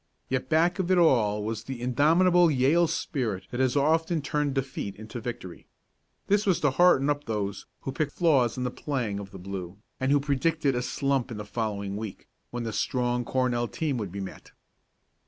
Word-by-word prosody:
Yet 130 0 -2
back 170 +4 +3
of 185 -1 -1
it 185 - +4
all 110 -11 +3
was 110 0 -3
the 135 -2 -5
indomitable 165 +8 +4
Yale 150 +5 +3
spirit 130 - -2
that 120 - -4
has 130 0 +2
often 160 +3 +2
turned 150 -2 -1
defeat 130 -7 -3
into 110 +3 -8
victory. 120 -7 -7 0.6
This 205 +1 +2
was 185 - +3
to 145 - +3
hearten 145 -2 +4
up 145 0 0
those 100 -2 -3
who 135 - -4
picked 145 +2 -2
flaws 135 -10 +2
in 125 - -2
the 125 - -1
playing 120 -10 -3
of 100 -1 -8
the 95 - -10
blue, 95 -1 -6 0.2
and 130 +1 +1
who 145 - +5
predicted 145 +1 +1
a 125 - -1
slump 135 +1 -1
in 115 - -6
the 105 - -6
following 105 -2 -3
week, 105 -3 -7 0.2
when 120 0 -4
the 115 -2 -4
strong 120 +2 0
Cornell 125 -1 0
team 155 -3 -2
would 100 -5 -4
be 100 +1 -5
met. 95 -1 -9
130 Hz, 195 wpm, -27 LUFS, 110-150 Hz, 0.6 s, who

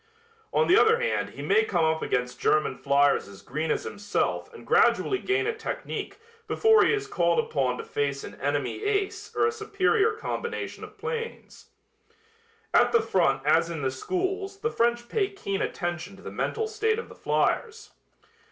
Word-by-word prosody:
On 475 - +3
the 365 - +6
other 455 +2 +5
hand - - 0
he - - -9
may 440 +1 +4
come 170 - +1
up 160 0 +1
against 125 0 -1
German 155 0 +2
fliers 140 -2 +2
as 100 -1 -13
green 155 +2 -3
as - - 0
himself 205 - -2
and 460 - -13
gradually 390 - +3
gain 395 +1 0
a 450 - 0
technique 450 - -5 0.3
before 440 0 +5
he - - +3
is 415 -2 0
called 170 - +1
upon 130 -4 0
to - - -5
face 140 -1 -2
an - - -8
enemy 145 - -1
ace 410 -1 -1
or - - +3
a 450 - +2
superior 425 0 +1
combination 460 +1 -4
of - - -11
planes. 465 0 -6 1.1
At - - +5
the 460 - +4
front 135 -7 +1
as 165 +3 +3
in 160 -4 -4
the 130 - +1
schools 385 - -3
the 455 - 0
French 240 - +1
pay 400 - 0
keen 200 - -4
attention 175 +2 -3
to 195 - -16
the - - -7
mental 445 -1 -2
state 440 0 0
of 465 - -5
the - - -12
fliers. 450 -1 -1
370 Hz, 180 wpm, -27 LUFS, -, 1.1 s, the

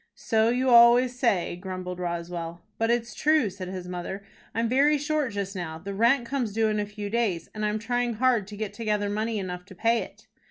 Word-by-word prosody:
"So 220 -1 +2
you 255 +2 +1
always 240 +1 +6
say," 200 -9 +1
grumbled 180 0 -6
Roswell. 170 -1 -4 0.2
"But 225 0 +1
it's 235 0 0
true," 305 -9 +2
said 185 -1 -7
his 185 -1 -6
mother. 180 +2 -5 0.3
"I'm 230 +1 +1
very 280 +5 +4
short 295 -2 -1
just 200 -1 -3
now. 160 -3 -4
The 195 +5 -6
rent 235 +5 +3
comes 240 -4 -2
due 220 0 +2
in 215 0 0
a 205 - -2
few 205 0 -6
days, 210 -8 0
and 215 - -4
I 210 - +2
am 210 - -1
trying 240 +1 -1
hard 240 -4 +2
to 205 -1 -9
get 210 -1 -4
together 210 -2 -1
money 215 +2 -1
enough 180 -2 -4
to 190 - -13
pay 230 +5 +2
it." - - -11
215 Hz, 215 wpm, -26 LUFS, 185-235 Hz, 0.3 s, always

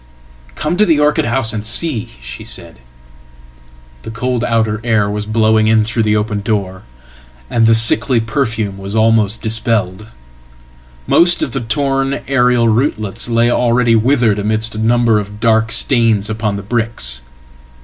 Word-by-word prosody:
"Come 155 +4 -2
to 210 - +4
the 160 -3 +2
orchid 150 0 +1
house 120 -2 +2
and 105 -2 -4
see," 120 +2 -1
shesaid. 65 0 -9 1.2
The - - -9
cold 120 +2 -3
outer 110 -2 -1
air 110 -3 +1
was 105 0 -4
blowing 110 0 +2
in 110 0 +3
through 115 +2 -2
the 105 -1 +1
open 105 -1 -2
door, 100 -3 -3 0.7
and 115 -1 +2
the 115 - +5
sicklyperfume 110 -2 +1
was 100 +2 -5
almost 110 -1 +1
dispelled. 110 -3 -2 1.0
Most 175 - +3
of - - -3
the 135 - -3
torn 135 +2 -1
aerial 125 -3 +2
rootlets 110 -2 -1
lay 115 0 +2
alreadywithered 120 -1 +2
amidst 110 +2 -1
a 110 - -6
number 115 -1 +2
of 105 0 -8
dark 110 0 +1
stains 115 -3 +2
upon 105 -2 -2
the 100 - -6
bricks. 105 - -3
110 Hz, 140 wpm, -15 LUFS, 105-120 Hz, 1.2 s, the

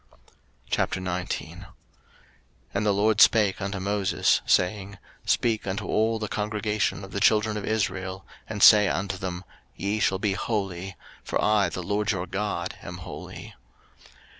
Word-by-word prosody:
03:019:001 90 -1 -2 1.1
And 100 +1 -1
the - - +4
LORD 105 +1 +2
spake 105 -3 +5
unto 100 0 -3
Moses, 100 0 +1
saying, 95 +2 +1 0.3
03:019:002 - - -4
Speak 110 -4 +1
unto 95 +1 -3
all 110 +1 +1
the 110 -1 -3
congregation 105 0 -1
of 95 - -10
the 100 - -3
children 105 +1 +3
of 105 - -4
Israel, 95 -3 -2 0.2
and 105 -2 -1
say 105 -1 +8
unto 95 +1 -2
them, 90 -1 -5 0.3
Ye 100 +2 -2
shall 95 -1 +2
be 100 0 0
holy: 95 -3 -3 0.3
for - - -2
I 105 -2 +3
the 90 - -5
LORD 105 +3 0
your 90 -2 -3
God 100 +3 -3
am - - -8
holy. - - -9
100 Hz, 145 wpm, -26 LUFS, 95-105 Hz, 1.1 s, say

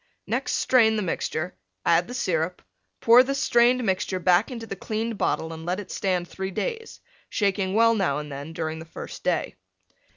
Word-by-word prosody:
Next - - -1
strain, 225 -4 +4
the 210 - -1
mixture, 175 0 -2 0.3
add 170 +1 +3
the 245 - -7
Syrup, 175 -5 -1 0.4
pour 235 +2 +8
the 275 +2 -1
strained 250 -2 +3
mixture 190 -2 0
back 180 +2 +3
into 235 -3 -6
the 195 - -6
cleaned 220 +2 -3
bottle 160 0 -1
and 160 0 -8
let 180 +3 -2
it 205 - -8
stand 180 -3 -1
3 190 +1 -5
days, 455 - -4 0.3
shaking 195 -2 0
well 230 +1 +5
now 190 -10 +1
and 150 -1 -6
then 140 +3 -7
during 160 -1 -4
the 160 - -9
first 165 - -9
day. - - -1
190 Hz, 185 wpm, -25 LUFS, 170-230 Hz, 0.4 s, pour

